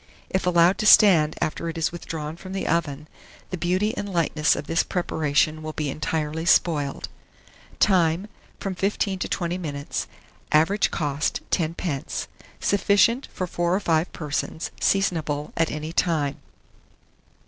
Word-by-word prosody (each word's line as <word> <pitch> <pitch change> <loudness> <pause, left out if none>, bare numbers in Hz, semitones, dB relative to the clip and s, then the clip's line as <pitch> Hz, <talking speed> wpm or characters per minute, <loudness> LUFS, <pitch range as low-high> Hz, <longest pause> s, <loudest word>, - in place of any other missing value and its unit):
If 190 -1 0
allowed 175 +1 +4
to 215 - +1
stand 170 -9 +6
after 165 +2 -2
it 165 - -6
is 165 - 0
withdrawn 160 -2 -6
from 185 +2 -9
the 195 - -3
oven, 150 -3 -1 0.4
the - - -1
beauty 185 +7 0
and 205 -1 -4
lightness 160 -3 +2
of - - -5
this 165 +3 +2
preparation 155 -3 0
will 155 0 -5
be 150 -3 -2
entirely 155 +1 -2
spoiled. 150 -5 +2 0.7
Time. 175 -2 +3 0.3
From 195 - -3
15 195 0 -1
to - - -2
20 175 0 -2
minutes. 145 -4 -4 0.4
Average 165 +7 +3
cost, 145 -2 -1
10d. 165 -4 -2 0.3
Sufficient 200 +5 +3
for 185 - -3
4 175 0 0
or - - +1
5 165 -3 +1
persons. 150 +1 -4
Seasonable 160 -7 0
at 165 -1 +1
any 155 +2 -5
time. 150 -6 0
165 Hz, 140 wpm, -24 LUFS, 155-185 Hz, 0.7 s, stand